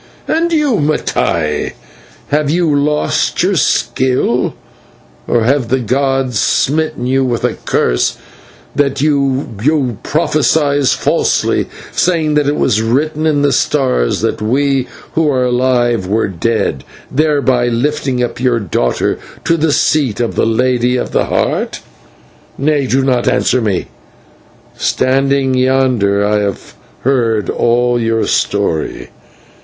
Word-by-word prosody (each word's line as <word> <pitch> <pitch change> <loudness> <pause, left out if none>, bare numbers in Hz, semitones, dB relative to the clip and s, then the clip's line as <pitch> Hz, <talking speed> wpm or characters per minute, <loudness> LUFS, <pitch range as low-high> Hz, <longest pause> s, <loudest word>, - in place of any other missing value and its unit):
And 335 +1 0
you, 300 -8 +2
Mattai, 85 - -1 0.6
have 150 0 +1
you 165 -2 +1
lost 150 +1 0
your - - +2
skill, 125 - 0 0.7
or 120 -2 +2
have 130 +1 +1
the 130 - +2
gods 130 -1 0
smitten 155 -2 0
you 135 +1 +1
with 120 -3 -2
a - - +1
curse, - - 0 0.6
that 140 -1 0
you 135 -3 0
prophesy 150 -2 +1
falsely, 130 - +1 0.2
saying 165 -4 +1
that 150 -1 +2
it 145 - +1
was 110 -6 +1
written 150 +7 0
in 145 -2 +1
the 145 - +3
stars 130 - +1
that - - -1
we 135 +3 +1 0.3
who 160 -2 +2
are 130 -3 +1
alive 125 -4 +1
were 105 +3 +1
dead, 95 - -1 0.3
thereby 140 -4 +1
lifting 130 +1 -1
up 120 - -4
your 125 -2 +2
daughter 80 - -1 0.2
to 165 - +2
the 160 -1 +1
seat 140 -7 +1
of 120 -1 -1
the - - +1
Lady 125 +1 +1
of - - -3
the - - +1
Heart. - - -1 0.8
Nay, 145 -1 +1
do 130 +2 +1
not 125 -2 +1
answer 125 0 +2
me. 100 -5 -1 0.9
Standing 135 0 +1
yonder 125 -6 +2
I 105 0 +1
have 100 -9 -4 0.3
heard 115 -5 +1
all 120 0 +1
your 115 0 0
story. 80 -10 -1
130 Hz, 130 wpm, -14 LUFS, 115-145 Hz, 0.9 s, the